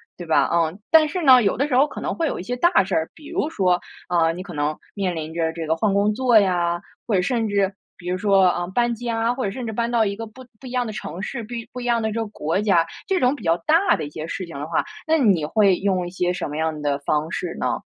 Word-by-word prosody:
对 175 - -9
吧？ 160 - +3
嗯， 170 +2 +1
但 315 -1 +6
是 360 +2 -3
呢， 260 -3 +8
有 200 -4 +1
的 280 +4 +1
时 270 - 0
候 275 +4 +5
可 - - -8
能 - - -2
会 330 - -1
有 - - -3
一 - - -5
些 245 +6 -3
大 345 - +4
事 190 0 -5
儿， 160 -1 0
比 300 -1 -13
如 300 - -1
说， 180 - +1 0.3
啊， 165 -2 +3
你 175 +2 -6
可 180 -2 -9
能 150 0 -1 0.2
面 190 -4 -2
临 160 0 -5
着 165 -1 0
这 165 -1 -5
个 160 +1 +1
换 200 +5 +1
工 205 +1 +2
作 245 0 +4
呀， 175 -3 +1 0.3
或 220 - +1
者 180 - +2
甚 230 0 0
至 200 -1 +1 0.2
比 180 -1 -7
如 180 - 0
说 195 -1 +3
啊 175 -1 +1
搬 240 +5 +1
家， 230 0 -1
或 255 +1 -4
者 200 - 0
甚 245 +5 -6
至 220 - -4
搬 235 +2 -1
到 235 -2 +2
一 200 -1 -2
个 225 +2 -6
不 255 +4 -14
不 265 - -10
一 - - -7
样 250 0 -1
的 220 - -5
城 180 -6 -6
市， 240 +3 -4
不 230 +2 -7 0.2
不 250 - -6
一 - - -6
样 240 -1 +2
的 220 -1 -1
这 225 - -2
个 225 - -2
国 175 -2 -2
家， 185 -6 +3 0.2
这 380 -1 +1
种 255 +1 +2
比 245 - -12
较 165 -1 +2
大 335 +5 +4
的 - - -4
一 - - -7
些 155 +1 -6
事 185 - -4
情 170 - -11
的 145 - -5
话， 165 - 0 0.2
那 320 +1 +4
你 200 - +3
会 200 0 +3
用 185 -3 0
一 - - -8
些 180 -1 0
什 180 - -3
么 150 +1 -5
样 160 -1 -1
的 145 -1 0
方 150 +3 -1
式 175 - -4
呢？ - - -1
200 Hz, 315 characters per minute, -22 LUFS, 170-240 Hz, 0.3 s, 呢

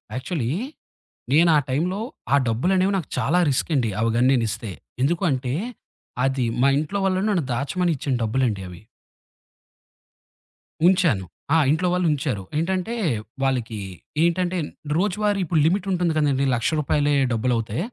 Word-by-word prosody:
Actually 130 -2 -2 0.8
నేనా 160 +2 +5
టైంలో 175 +9 0 0.3
ఆ - - +7
డబ్బులనేవి 185 - +2
నాకు 165 - -4
చాలా 180 - +2
రిస్కండి 135 -3 +1
అవిగన్ననిస్తే. 115 -2 +1 0.3
ఎందుకుంటే, 135 -4 0 0.7
అది 135 -2 0 0.2
మా 135 - +5
ఇంట్లో 155 +7 -2
వాళ్ళు 185 -1 +1
నన్ను 180 -7 +1
దాచమని 170 +7 0
ఇచ్చిన 135 +1 -2
డబ్బులండి 110 -3 0
అవి. 90 +1 -11 2.1
ఉంచాను. 170 - +3 0.3
ఆ! - - +6
ఇంట్లో 170 +4 +1
వాళ్ళుంచారు. 150 - 0
ఏంటంటే 190 +7 -1 0.5
వాళ్ళకి 125 -4 -1 0.5
ఏంటంటే 180 +1 +1 0.4
రోజువారీ 205 +2 +1
ఇప్పుడు 160 0 +1
లిమిటుంటుంది 180 -1 +1
కదండీ 140 -2 +2
1,00,000 115 - 0
రూపాయిలే 145 0 +1 0.2
డబ్బులవుతే, 115 0 -1
150 Hz, 110 wpm, -23 LUFS, 125-180 Hz, 2.1 s, ఆ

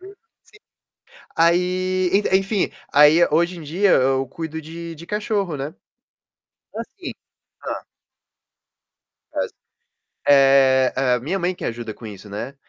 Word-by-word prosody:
Sim. 390 +2 -12 1.2
Aí 180 +2 +2
en 195 -1 +3
enfim, 195 +1 -1 0.2
aí 150 +4 +7
hoje 170 +3 +1
em - - -8
dia, 180 +6 +1
eu 135 +1 +2
cuido 160 +3 -6
de 165 +1 -8
de 165 +2 -11
cachorro, 205 -6 -2
né. 140 +3 -5 1.0
É - - -4
assim - - -8 0.5
Hã. - - -2 1.6
As - - -2 0.8
eh-eh, 135 -2 +4
minha 165 +10 -2
mãe 180 0 -1
que - - -9
ajuda 115 -2 -4
com 115 - -11
isso, 105 0 -10
né, 110 +7 -6
160 Hz, 125 wpm, -21 LUFS, 135-185 Hz, 1.6 s, aí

